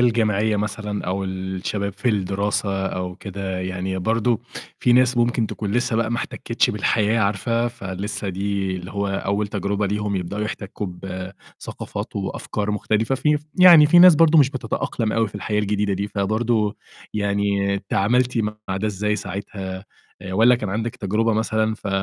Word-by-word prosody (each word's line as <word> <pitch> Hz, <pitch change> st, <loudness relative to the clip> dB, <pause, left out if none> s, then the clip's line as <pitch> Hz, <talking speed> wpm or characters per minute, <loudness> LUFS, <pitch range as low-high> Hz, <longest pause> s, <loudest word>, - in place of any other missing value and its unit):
الجامعية 110 Hz, -3 st, +2 dB
مثلًا 105 Hz, 0 st, -3 dB
أو 95 Hz, +2 st, -1 dB
الشباب 95 Hz, +2 st, -3 dB
في 100 Hz, +6 st, -2 dB
الدراسة 100 Hz, -1 st, 0 dB
أو 90 Hz, -1 st, -4 dB
كده، 95 Hz, -2 st, -5 dB
يعني 95 Hz, +1 st, -3 dB
برضه 115 Hz, +3 st, +1 dB, 0.4 s
في 125 Hz, -, +3 dB
ناس 125 Hz, 0 st, +4 dB
ممكن 120 Hz, -1 st, +2 dB
تكون 100 Hz, -1 st, -4 dB
لسّه 120 Hz, -1 st, +1 dB
بقى 115 Hz, 0 st, 0 dB
ما 120 Hz, -, 0 dB
احتكّتش 120 Hz, +1 st, -1 dB
بالحياة 105 Hz, +1 st, +1 dB
عارفة 115 Hz, +4 st, +1 dB
فلسّه 100 Hz, -1 st, -5 dB
دي 95 Hz, 0 st, -2 dB
اللي 90 Hz, +1 st, -8 dB
هو 100 Hz, 0 st, -2 dB
أول 100 Hz, +2 st, -1 dB
تجربة 100 Hz, 0 st, -1 dB
ليهم 105 Hz, 0 st, -1 dB
يبدؤوا 95 Hz, +3 st, -3 dB
يحتكّوا 105 Hz, -1 st, -5 dB
بثقافات 90 Hz, +1 st, -7 dB
وأفكار 105 Hz, 0 st, -3 dB
مختلفة، 110 Hz, +3 st, 0 dB
في 150 Hz, +3 st, +2 dB
ف -, -, -7 dB, 0.2 s
يعني 170 Hz, -5 st, +9 dB
في 175 Hz, +3 st, +6 dB
ناس 180 Hz, -1 st, +9 dB
برضه 165 Hz, 0 st, +5 dB
مش 140 Hz, -2 st, +5 dB
بتتأقلم 115 Hz, -3 st, -2 dB
أوي 115 Hz, -1 st, +1 dB
في 100 Hz, -, -20 dB
الحياة 105 Hz, +1 st, -2 dB
الجديدة 105 Hz, 0 st, 0 dB
دي، 100 Hz, +2 st, -2 dB
فبرضه 110 Hz, +1 st, 0 dB, 0.4 s
يعني 100 Hz, -1 st, 0 dB
تعاملتِ 125 Hz, +5 st, +2 dB
مع 105 Hz, -3 st, -3 dB
ده 105 Hz, +3 st, -1 dB
إزاي 105 Hz, +1 st, -1 dB
ساعتها 95 Hz, -1 st, -6 dB, 0.4 s
آآ 95 Hz, -1 st, -6 dB
والّا 115 Hz, +6 st, +5 dB
كان 110 Hz, -5 st, -3 dB
عندِك 115 Hz, +4 st, -3 dB
تجربة 110 Hz, +1 st, 0 dB
مثلًا 110 Hz, 0 st, 0 dB
ف 105 Hz, -, -7 dB
105 Hz, 160 wpm, -22 LUFS, 100-115 Hz, 0.4 s, يعني